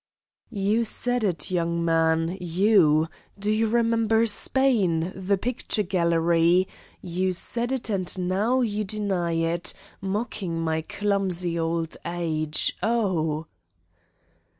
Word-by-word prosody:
"You 210 +1 +1
said 245 +2 0
it, 180 -5 0
you, 180 - +1
young 170 0 -1
man 165 +1 +2
you. 175 -3 +3 0.3
Do 205 +1 -1
you 220 +1 +2
remember 230 0 +2
Spain, 205 -7 +1
the 195 +1 0
picture 230 -1 -1
gallery! 170 0 +2 0.4
You 185 +1 -1
said 235 +7 -3
it 265 -2 -2
and 185 -1 -1
now 215 +8 +1
you 215 -3 -1
deny 195 -4 -1
it, 165 +1 -1 0.3
mocking 195 -3 -3
my 160 -1 0
clumsy 185 -2 -1
old 165 0 -2
age. 160 -3 0
Oh!" 175 -9 0
185 Hz, 115 wpm, -25 LUFS, 165-215 Hz, 0.4 s, you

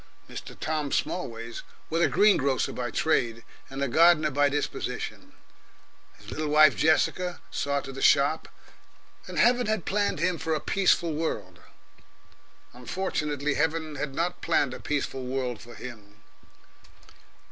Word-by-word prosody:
Mr. - - -9
Tom 155 -3 -2
Smallways 115 -9 -3 0.3
was 165 +1 +1
a 170 - +5
green 205 +6 +5
grocer 135 -1 0
by 125 -1 -3
trade 115 -3 0 0.3
and 135 +1 -4
a - - +1
gardener 155 +2 +5
by 145 +1 +3
disposition; 145 +1 -4 0.8
his - - -12
little 155 0 -3
wife 150 -2 +6
Jessica 175 +3 +1
saw 140 -1 -1
to 135 - -8
the 135 - -8
shop, 145 +3 +3 0.8
and - - -7
Heaven 245 0 +4
had 215 -4 -1
planned 205 -3 0
him 170 +1 0
for 160 -1 -1
a - - -1
peaceful 175 -2 +2
world. 160 +2 -3 1.1
Unfortunately 150 +1 -2
Heaven 160 +1 -1
had 145 -1 -4
not 175 +1 -2
planned 145 -6 +1
a - - -7
peaceful 135 -3 -3
world 125 -3 -3
for 120 0 -12
him. 105 -4 -11
150 Hz, 140 wpm, -27 LUFS, 135-165 Hz, 1.1 s, wife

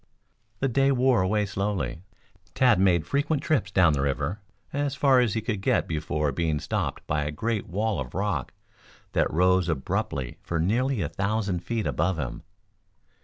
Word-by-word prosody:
The 135 - +2
day 135 +2 +3
wore 130 -3 +3
away 105 +3 +1
slowly. 100 -9 -2 0.5
Tad 125 -7 +4
made 90 -4 +3
frequent 145 - 0
trips 155 -3 +1
down 85 -5 +4
the 70 - 0
river 70 +7 -1 0.3
as 145 -1 -1
far 135 -1 +4
as 120 -4 +1
he 110 - 0
could 105 -3 -3
get - - +1
before 75 -1 -1
being 80 +1 0
stopped - - -3
by 75 0 0
a 75 - -2
great 110 +8 -2
wall 105 +1 -1
of 65 -2 -6
rock - - -1 0.6
that - - +1
rose 90 +1 +3
abruptly 65 -3 -2
for 85 - -3
nearly 115 +6 +1
a 75 - -3
thousand 100 -2 -1
feet 115 +4 -3
above 90 +1 0
him. 65 -6 -4
95 Hz, 170 wpm, -26 LUFS, 80-120 Hz, 0.6 s, Tad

